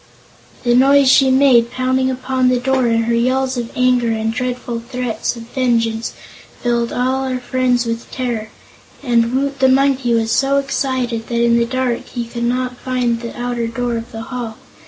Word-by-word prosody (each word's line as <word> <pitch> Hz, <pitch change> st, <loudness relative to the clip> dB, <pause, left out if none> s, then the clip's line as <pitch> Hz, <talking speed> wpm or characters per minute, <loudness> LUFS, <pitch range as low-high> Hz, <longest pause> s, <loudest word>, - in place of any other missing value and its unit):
The 240 Hz, -1 st, +2 dB
noise 275 Hz, +2 st, +5 dB
she 270 Hz, 0 st, +5 dB
made, 260 Hz, -3 st, +4 dB
pounding 260 Hz, +1 st, 0 dB
upon 260 Hz, 0 st, 0 dB
the 250 Hz, -, +2 dB
door, 260 Hz, 0 st, +1 dB
and 230 Hz, 0 st, +1 dB
her 235 Hz, -, 0 dB
yells 255 Hz, +2 st, +1 dB
of 240 Hz, -2 st, -3 dB
anger 250 Hz, -2 st, +2 dB
and 225 Hz, 0 st, -1 dB
dreadful 250 Hz, -1 st, -3 dB
threats 245 Hz, 0 st, -3 dB
of 230 Hz, -, -9 dB
vengeance, 230 Hz, -3 st, 0 dB, 0.5 s
filled 235 Hz, -1 st, 0 dB
all 260 Hz, +2 st, 0 dB
our 260 Hz, -1 st, -2 dB
friends 250 Hz, -1 st, 0 dB
with 230 Hz, 0 st, -4 dB
terror, 235 Hz, -4 st, -3 dB, 0.5 s
and 235 Hz, -2 st, +2 dB
Woot 275 Hz, 0 st, -1 dB
the 265 Hz, 0 st, +4 dB
Monkey 265 Hz, -2 st, +2 dB
was 225 Hz, 0 st, 0 dB
so 275 Hz, +3 st, +2 dB
excited 260 Hz, -4 st, -1 dB
that 235 Hz, -1 st, 0 dB
in 235 Hz, 0 st, +3 dB
the 235 Hz, -, +2 dB
dark 255 Hz, -1 st, -2 dB
he 240 Hz, -2 st, -4 dB
could 235 Hz, 0 st, -4 dB
not 250 Hz, +1 st, -1 dB
find 250 Hz, -2 st, -1 dB
the 235 Hz, 0 st, -7 dB
outer 240 Hz, -1 st, -2 dB
door 240 Hz, +1 st, -2 dB
of 230 Hz, 0 st, -6 dB
the 225 Hz, 0 st, -6 dB
hall. 235 Hz, -2 st, -6 dB
245 Hz, 180 wpm, -18 LUFS, 235-260 Hz, 0.5 s, noise